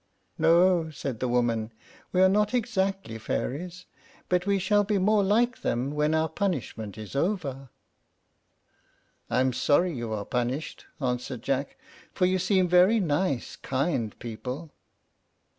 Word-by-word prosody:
"No," 170 +1 +4
said 135 -6 -5
the 130 - -1
woman; 120 -2 0 0.4
"we 185 0 +4
are - - +7
not 210 +4 +2
exactly 195 - -1
fairies; 175 +10 -4 0.4
but 180 +1 +1
we 200 0 +3
shall 205 +2 +2
be 205 0 0
more 205 +2 +3
like 235 +6 +2
them 125 +4 -1
when 150 +1 +1
our 160 0 +2
punishment 145 - -3
is 110 +3 -8
over." 140 -6 -2 1.6
"I 125 - +2
am 130 -1 +1
sorry 150 +8 +2
you 120 -4 -4
are 105 -2 -3
punished," 125 +4 -3
answered 125 -2 -3
Jack, 140 - -2 0.4
"for 185 - +3
you 185 +1 +2
seem 185 0 +2
very 180 +6 +5
nice, 150 - -1
kind 130 - -2
people." 125 +7 -6
160 Hz, 140 wpm, -27 LUFS, 125-190 Hz, 1.6 s, are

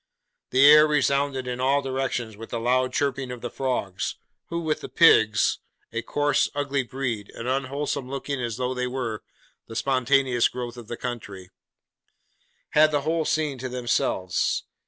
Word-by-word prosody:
The 130 +2 +5
air 150 +1 +9
resounded 140 -2 +1
in 125 0 -4
all 140 +2 +2
directions 130 -4 -2
with 115 +2 -10
the 115 - -3
loud 130 +2 +1
chirping 140 -1 -1
of 125 -1 -7
the 120 - -5
frogs, 125 -8 -2 0.3
who, 170 - -3
with 155 -2 -1
the - - -7
pigs 110 -11 +4 0.3
(a 115 - -1
coarse, 145 +4 +1
ugly 140 -1 0
breed, 125 -5 -4
as 115 - -7
unwholesome 135 +1 -2
looking 140 0 -4
as 115 -2 -3
though 125 0 -1
they 125 0 -2
were 125 -4 -3 0.5
the 115 - -9
spontaneous 130 0 +2
growth 120 -1 -6
of 120 -3 -11
the 120 - -5
country), 100 -7 -6 1.2
had 155 +1 +5
the 145 -2 0
whole 160 +2 0
scene 150 -4 -1
to 130 +1 -4
themselves. 120 -7 0
130 Hz, 160 wpm, -25 LUFS, 120-140 Hz, 1.2 s, air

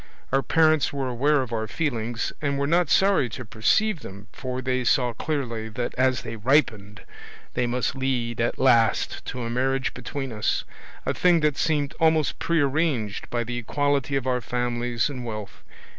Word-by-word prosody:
Our 135 - +3
parents 155 0 +3
were 140 -2 -2
aware 135 +3 +2
of 120 -2 -7
our 110 -1 -1
feelings, 120 -5 -2
and 140 -2 0
were 140 - 0
not 170 +1 +2
sorry 190 -10 +4
to 130 +3 -7
perceive 165 - +1
them, 100 -5 -10
for 130 -1 -4
they 130 0 -1
saw 125 0 +2
clearly 115 -4 -3
that 120 +2 -3
as 130 -1 +1
they 115 - -6
ripened 110 -4 +1 0.5
they 125 -1 0
must 120 0 -1
lead 125 -3 -1
at 120 - 0
last 120 -4 +3
to 125 - -4
a 115 - -3
marriage 130 +2 0
between 135 +1 -5
us, 105 -1 0 0.4
a - - 0
thing 175 -2 +3
that 150 -2 +2
seemed 145 -2 0
almost 160 -2 +2
prearranged 145 -8 0
by 120 -1 -1
the 120 +1 -4
equality 145 +2 0
of 135 -2 -1
our 125 -1 0
families 120 0 -1
and 130 -4 -6
wealth. 105 -3 -7
130 Hz, 175 wpm, -25 LUFS, 120-145 Hz, 0.5 s, sorry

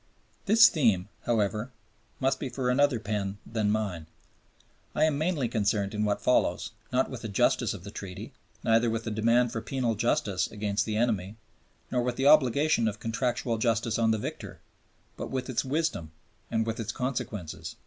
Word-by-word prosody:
This 225 +3 +8
theme, 105 - +2 0.2
however, 110 0 0 0.5
must 135 0 +1
be 135 - -3
for 125 -1 -1
another 140 -2 +3
pen 105 -2 -3
than 110 -2 -1
mine. 100 -7 -2 0.9
I - - +2
am 155 -2 +3
mainly 155 -6 0
concerned 100 -3 0
in 105 0 -1
what 105 -1 -1
follows, 125 -8 +2 0.2
not 130 +2 +1
with 125 -3 -6
the 115 - -4
justice 110 +1 +1
of 90 - -10
the 100 - -8
Treaty, 95 -4 -8 0.3
neither 115 +1 +3
with 115 0 -2
the 115 - -4
demand 115 +3 +2
for 115 - -3
penal 125 -3 -1
justice 110 -3 0
against 105 0 -1
the 105 -1 -1
enemy, 110 -4 0 0.6
nor 125 - +1
with 125 0 -1
the 135 - -1
obligation 140 -3 +4
of 105 0 -3
contractual 120 0 -1
justice 115 0 +1
on 115 -1 +3
the 110 - +2
victor, - - -6 0.6
but - - -5
with 130 0 -3
its 120 - 0
wisdom 135 - -1 0.4
and 110 -1 0
with 115 +1 -3
its 115 - -3
consequences. 100 - -4
115 Hz, 175 wpm, -28 LUFS, 105-125 Hz, 0.9 s, This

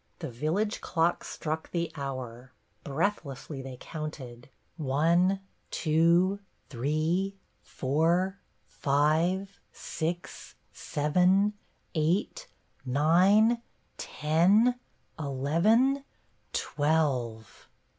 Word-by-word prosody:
The - - -6
village 165 - -1
clock 170 0 0
struck 160 0 -4
the 170 -2 -2
hour; 130 -3 -6 0.3
breathlessly 140 -3 -3
they 130 -1 -8
counted, 135 -6 -7 0.2
— - - -43
one, 170 +7 +2 0.3
two, 170 +5 +3 0.3
three, 155 +9 -1 0.2
four, 170 +8 0 0.3
five, 160 +7 0
six, 170 +1 -5 0.2
seven, 180 +7 +2 0.4
eight, 180 - 0 0.5
nine, 195 +10 +4 0.4
ten, 180 +11 +3 0.5
eleven, 170 - +2 0.5
twelve 135 -8 -1
160 Hz, 75 wpm, -29 LUFS, 140-190 Hz, 0.5 s, nine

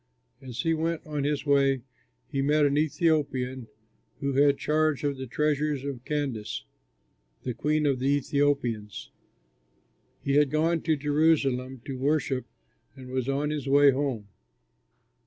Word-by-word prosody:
As 130 -1 -5
he 165 +2 +1
went 165 +1 -2
on 150 -2 -3
his 145 -1 -1
way 135 -3 +3 0.4
he 135 - -2
met 150 +2 +3
an 140 0 +2
Ethiopian 145 -5 0 0.5
who 140 -1 -1
had 140 +1 +4
charge 155 -1 +1
of 145 -1 0
the 130 0 -6
treasures 150 +1 0
of 135 -4 -5
Candace, 140 -8 -3 0.8
the 125 - -2
queen 150 +5 0
of 135 -3 +1
the 130 - -1
Ethiopians. 140 -6 0 1.1
He 140 +1 +2
had 145 -1 +4
gone 160 +2 +1
to 160 -1 +1
Jerusalem 140 -4 +1
to 135 -2 -5
worship 140 -2 0 0.5
and 130 -2 -10
was 130 0 -1
on 145 +2 0
his 150 -2 -4
way 140 +1 +6
home. 130 -6 -2
140 Hz, 140 wpm, -27 LUFS, 130-150 Hz, 1.1 s, way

